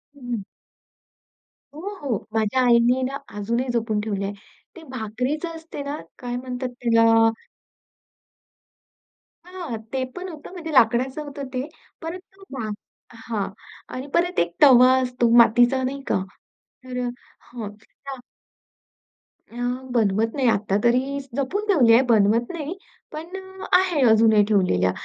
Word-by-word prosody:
हं. 245 -6 -5 1.3
हो, 310 - -8 0.2
हो. 250 -8 -1 0.2
माझ्या 220 +3 +1
आईने 240 +2 +4
ना 270 +2 -2 0.2
अजूनही 235 +5 -1
जपून 220 -2 0
ठेवल 200 -2 -3
आहे. 200 - -3 0.4
ते 335 - -11
भाकरीच 255 +6 -3
असते 325 -3 -7
ना, 285 +1 -4 0.2
काय 245 -1 -4
म्हणतात 250 0 -4
त्याला? 230 -1 +5 2.2
हां. 355 -10 -6 0.2
ते 260 -1 0
पण 365 +1 -6
होतं. 310 +1 -10
म्हणजे 330 -4 -7
लाकडाच 255 +3 +3
होतं 285 -2 -6
ते. 255 +3 -2 0.3
परत 330 +3 -5
ते 390 0 -18
भा 220 -3 -3 0.4
हां. 225 -3 -4 0.5
आणि 260 +2 -5
परत 355 +1 +1
एक 170 0 0
तवा 255 -2 +8
असतो 250 -2 0
मातीचा 240 +3 +5
नाही 275 +2 -3
का, 190 - +1 0.6
तर 250 -1 -6
अ, - - -2 0.4
हो. 235 - -5 0.4
हां. 270 -2 -5 1.3
अ, - - -14 0.4
बनवत 220 0 +2
नाही. 265 -3 +1
आता 200 -2 +1
तरी 260 +4 +2 0.2
जपून 345 +10 -1
ठेवली 265 - +5
आहे, 235 - +7
बनवत 225 +2 +3
नाही. 325 +3 -5 0.3
पण 310 +2 -6
अ, 380 0 -10
आहे 360 -6 +1
अजूनही 220 -1 +5
ठेवलेल्या. 180 - +2
250 Hz, 135 wpm, -23 LUFS, 225-285 Hz, 2.2 s, तवा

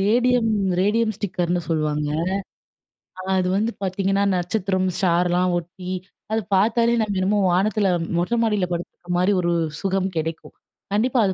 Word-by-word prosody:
Radium 240 +3 +3 0.3
radium 220 +3 +2
ஸ்டிக்கர்னு 180 -4 -1
சொல்லுவாங்க. 150 -2 0 1.1
அ - - -4 0.2
அது 180 - 0
வந்து 220 +3 +1
பார்த்தீங்கன்னா, 195 +1 0
நட்சத்திரம், 185 +1 0
ஸ்டார்லாம் 180 0 +2
ஒட்டி, 180 +2 -7 0.4
அத 220 - +2 0.2
பாத்தாலே 230 +4 +3
நம்ம 205 -3 -1
என்னமோ 200 +3 +2
வானத்தில, 200 +3 +2 0.3
மொட்ட 180 +8 0
மாடியில 210 -5 +1
படுத்துக்க 175 +1 -6
மாரி 180 +3 +3
ஒரு 175 0 0 0.3
சுகம் 195 0 0
கிடைக்கும். 160 +1 -4 0.4
கண்டிப்பா 240 +5 +2
அத 190 - +1
190 Hz, 130 wpm, -22 LUFS, 180-215 Hz, 1.1 s, Radium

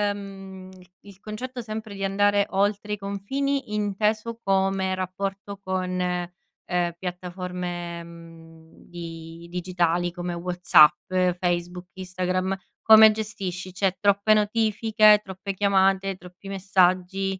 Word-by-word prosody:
mhmm, 195 -2 -10 0.3
il 200 -2 -15
concetto 245 +5 -6
sempre 220 -1 -6
di 195 0 -6
andare 205 +1 +2
oltre 205 +1 0
i - - -2
confini, 215 +5 -3
inteso 215 +2 -1
come 190 -1 +1
rapporto 195 +2 -5
con, 185 -1 -2
ehm, 180 -1 -3
piattaforme, 180 -1 -5
mhmm, 165 -1 -15 0.2
di 165 -1 -9
digitali 175 -1 0
come 175 0 -5
WhatsApp, 175 -1 +4 0.3
Facebook, 175 0 -2
Instagram, 185 0 -2 0.2
come 220 0 +8
gestisci? 195 -4 -5
Cioè 190 0 0
troppe 200 +1 +3
notifiche, 215 0 +4
troppe 190 0 -6
chiamate, 195 -1 +2
troppi 180 +2 -14
messaggi? 190 0 +1
190 Hz, 105 wpm, -25 LUFS, 180-205 Hz, 0.3 s, come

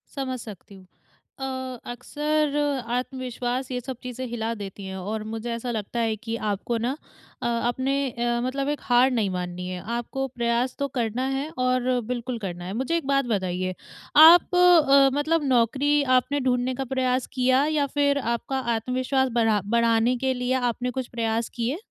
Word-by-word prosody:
समझ 260 -2 -3
सकती 205 -3 -11
हूँ। 190 -1 -15 0.5
अ, 270 - -5 0.5
अक्सर 300 +3 -1 0.4
आत्मविश्वास 250 0 -3
ये 250 - -1
सब 260 0 -6
चीज़ें 250 +1 -5
हिला 230 -1 -3
देती 200 -1 -8
हैं, 190 0 -6
और 210 +3 -4
मुझे 225 +1 -4
ऐसा 235 +1 -4
लगता 225 +1 -3
है 225 -1 +1
कि 225 +2 -5 0.2
आपको 215 +4 -2
ना 245 +6 -2 0.5
अ, - - +1 0.2
अपने 260 +3 0 0.2
अ, 240 +1 -1
मतलब 275 +2 -1
एक 295 - -2
हार 250 +2 +4
नहीं 220 -5 +1
माननी 180 0 -4
है, 180 -1 -5 0.2
आपको 270 +3 -3
प्रयास 235 +2 0
तो 280 - 0
करना 235 +2 -1
है 290 +3 -3 0.2
और 255 0 +1
बिल्कुल 245 0 -3
करना 175 -4 -5
है। 190 - -5
मुझे 265 +8 0
एक 320 - -5
बात 275 -1 +2
बताइए, 185 -1 -1 0.4
आप 335 +4 +8
अ, 295 -7 +6
मतलब 310 +1 +1
नौकरी 265 +5 +2 0.2
आपने 285 +3 0
ढूँढ़ने 250 +1 +1
का 270 - -2
प्रयास 255 -1 +1
किया, 260 +1 +3
या 300 -2 +1
फिर 285 0 +3 0.2
आपका 265 +3 -3 0.2
आत्मविश्वास 255 +3 0
बढ़ा 220 -3 +3
बढ़ाने 235 +1 +3
के 260 - +2
लिए 250 0 -1 0.2
आपने 250 +2 -4
कुछ 255 - -4
प्रयास 225 0 0
किए? 240 +5 -1
250 Hz, 175 wpm, -25 LUFS, 225-270 Hz, 0.5 s, आप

